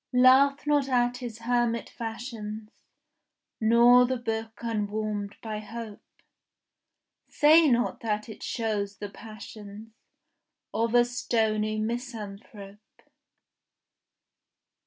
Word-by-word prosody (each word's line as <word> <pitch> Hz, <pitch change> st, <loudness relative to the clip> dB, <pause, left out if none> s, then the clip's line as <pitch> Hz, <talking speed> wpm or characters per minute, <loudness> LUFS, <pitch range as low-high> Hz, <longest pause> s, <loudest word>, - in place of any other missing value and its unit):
Laugh 265 Hz, +3 st, +5 dB
not 290 Hz, -2 st, +2 dB
at 245 Hz, -1 st, +2 dB
his 240 Hz, -3 st, -7 dB
hermit 235 Hz, -1 st, 0 dB
fashions 225 Hz, -2 st, -7 dB, 0.9 s
Nor 235 Hz, +2 st, +6 dB
the 260 Hz, 0 st, -1 dB
book 225 Hz, -2 st, -4 dB
unwarmed 210 Hz, -2 st, -3 dB
by 215 Hz, -2 st, -4 dB
hope; 215 Hz, 0 st, -8 dB, 1.3 s
Say 310 Hz, +1 st, +5 dB
not 240 Hz, -1 st, +1 dB
that 215 Hz, -2 st, -2 dB
it 220 Hz, -, -10 dB
shows 205 Hz, -4 st, -2 dB
the 205 Hz, 0 st, -6 dB
passions 215 Hz, 0 st, -11 dB, 0.8 s
Of 230 Hz, +1 st, 0 dB
a 240 Hz, 0 st, +6 dB
stony 220 Hz, -3 st, 0 dB
misanthrope. 215 Hz, -3 st, -7 dB
225 Hz, 95 wpm, -27 LUFS, 215-245 Hz, 1.3 s, Nor